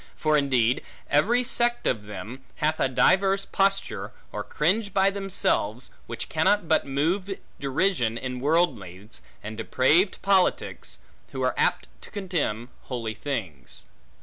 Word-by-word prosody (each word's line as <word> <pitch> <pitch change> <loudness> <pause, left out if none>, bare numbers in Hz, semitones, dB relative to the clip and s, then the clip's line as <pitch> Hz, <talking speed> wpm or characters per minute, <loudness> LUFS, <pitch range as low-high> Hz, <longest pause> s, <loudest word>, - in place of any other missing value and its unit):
For 155 -1 +1
indeed, 130 -4 +2 0.3
every 225 +13 +3
sect 240 -1 +1
of 105 -4 0
them, 105 +6 -8
hath 155 +1 0
a - - +3
diverse 195 +8 +3
posture, 195 0 0 0.2
or - - -4
cringe 200 +6 0
by 195 0 +4
themselves, 190 - -1 0.2
which 115 0 -5
cannot 165 +4 +2
but 155 -3 +2
move 175 +8 -1 0.2
derision 135 - +1
in 125 +1 -4
worldlings, 115 - -1 0.2
and 110 +1 -6
depraved 140 - +2
politics, 195 -2 +1 0.4
who - - -3
are - - +2
apt - - +1
to - - -12
contemn 165 - -2 0.2
holy 115 -4 -4
things. 105 - -6
150 Hz, 130 wpm, -26 LUFS, 115-195 Hz, 0.4 s, by